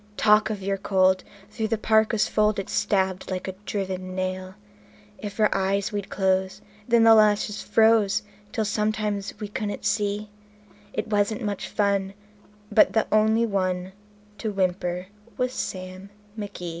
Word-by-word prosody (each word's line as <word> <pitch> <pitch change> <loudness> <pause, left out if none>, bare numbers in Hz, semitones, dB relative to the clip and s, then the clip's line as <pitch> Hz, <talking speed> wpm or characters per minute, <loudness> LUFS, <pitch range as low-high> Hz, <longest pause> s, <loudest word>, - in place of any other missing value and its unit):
Talk 210 0 +4
of 205 -3 -4
your 195 0 -1
cold! 190 -1 +2 0.3
through 220 -2 -2
the 225 0 0
parka's 220 0 +2
fold 215 0 +2
it 195 - -4
stabbed 190 -2 0
like 185 0 -3
a - - -2 0.2
driven 185 -2 -3
nail. 185 0 -3 0.6
If 205 0 -7
our 215 - +4
eyes 195 +3 0
we'd 205 -2 -4
close, 190 0 0 0.3
then 235 -1 +4
the 225 0 +8
lashes 210 -1 +3
froze 220 -3 +3 0.3
till 220 - -1
sometimes 210 -1 -1
we 210 - -4
couldn't 205 0 -4
see; 205 0 -1 0.6
It 215 - -2
wasn't 205 +1 0
much 205 -2 -3
fun, 200 -2 0 0.6
but 210 - +5
the 220 - +2
only 220 +2 +4
one 185 -3 -1 0.5
to 220 - -2
whimper 180 -2 -1 0.3
was 250 0 -1
Sam 185 -1 -5 0.3
McGee. 200 -5 -6
205 Hz, 145 wpm, -25 LUFS, 190-215 Hz, 0.6 s, the